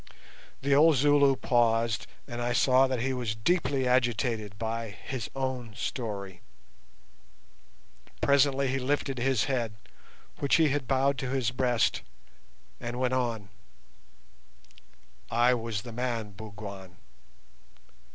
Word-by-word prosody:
The 140 0 +2
old 155 +2 +6
Zulu 140 0 +4
paused, 115 -3 +1 0.2
and 120 0 -5
I 120 0 0
saw 130 +1 +4
that 130 -3 -2
he 135 +2 0
was 120 -4 -2
deeply 135 +1 +1
agitated 120 -4 0
by 115 +1 -3
his 110 +5 -6
own 130 -4 -3
story. 100 -7 -5 1.8
Presently 140 -1 +3
he 135 +1 0
lifted 135 0 -1
his 130 0 +2
head, 120 -6 -2 0.6
which 140 - +3
he 160 -2 +4
had 135 -2 -1
bowed 135 0 +2
to 130 - -3
his 130 -3 0
breast, 125 -2 +1 0.8
and 120 +1 -5
went 130 0 +1
on: 115 -6 -1 1.8
"I 120 +2 +4
was 115 -4 -3
the 120 - -8
man, 115 -3 -3
Bougwan. 100 -3 -9
125 Hz, 120 wpm, -28 LUFS, 115-135 Hz, 1.8 s, old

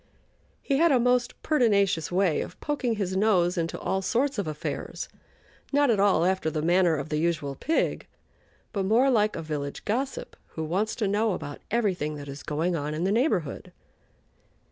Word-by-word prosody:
He 275 - +1
had 335 +2 +4
a 260 - +4
most 245 0 +1
pertinacious 200 - +2
way 180 -3 +2
of - - -8
poking 275 -6 -1
his 190 -3 -2
nose 190 -3 +3
into 165 -2 -2
all 190 - -1
sorts 250 +5 0
of 195 - -2
affairs, 150 -1 -4 0.6
not 285 -2 +4
at 210 - +1
all 195 -4 +4
after 185 -3 +1
the 155 -1 -3
manner 175 0 +3
of 145 0 -4
the 150 - 0
usual 155 -4 -1
pig, 320 - -1 0.7
but 200 - 0
more 235 +7 +4
like 215 -3 +2
a 165 - -4
village 145 -2 -5
gossip 260 +6 -2 0.2
who 160 - -3
wants 190 +7 -1
to 215 - -1
know 210 +1 +1
about 145 -4 -6
everything 185 -10 0
that 145 -1 -8
is 140 +1 -7
going 165 +4 -1
on 150 -1 -3
in 160 - -2
the 190 - +1
neighborhood. 210 - 0
190 Hz, 180 wpm, -27 LUFS, 160-230 Hz, 0.7 s, had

